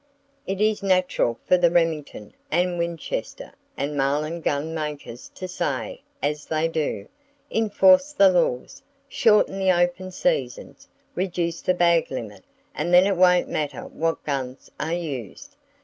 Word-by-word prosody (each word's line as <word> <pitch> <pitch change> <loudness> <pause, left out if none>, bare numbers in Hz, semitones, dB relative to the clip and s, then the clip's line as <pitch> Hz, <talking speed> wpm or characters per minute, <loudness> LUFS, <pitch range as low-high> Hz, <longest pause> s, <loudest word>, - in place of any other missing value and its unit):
It 195 0 -3
is 215 0 +1
natural 185 -11 +1
for 180 - +4
the 175 -1 +4
Remington, 160 -10 -1 0.2
and 175 0 0
Winchester, 170 -2 -4 0.2
and 145 +1 -3
Marlin 150 +4 -1
gun 145 +1 -1
makers 150 -6 -6
to 185 - -6
say, 150 -9 -3 0.2
as 150 +1 -2
they 160 +1 0
do, 160 -2 -3 0.4
"Enforce 275 +6 +4
the 200 -9 +5
laws! 165 -8 -1 0.3
Shorten 210 -7 +3
the 190 -1 +3
open 175 +1 0
seasons! - - -2 0.3
Reduce 175 -2 -2
the 185 - +1
bag 170 -1 +3
limit, 115 -5 -7 0.3
and 175 - -2
then 180 +1 +7
it 200 -1 +1
won't 180 0 +4
matter 150 -2 -3
what 165 0 -3
guns 135 -2 -4
are 160 - -2
used! 140 - -7
170 Hz, 140 wpm, -24 LUFS, 150-185 Hz, 0.4 s, then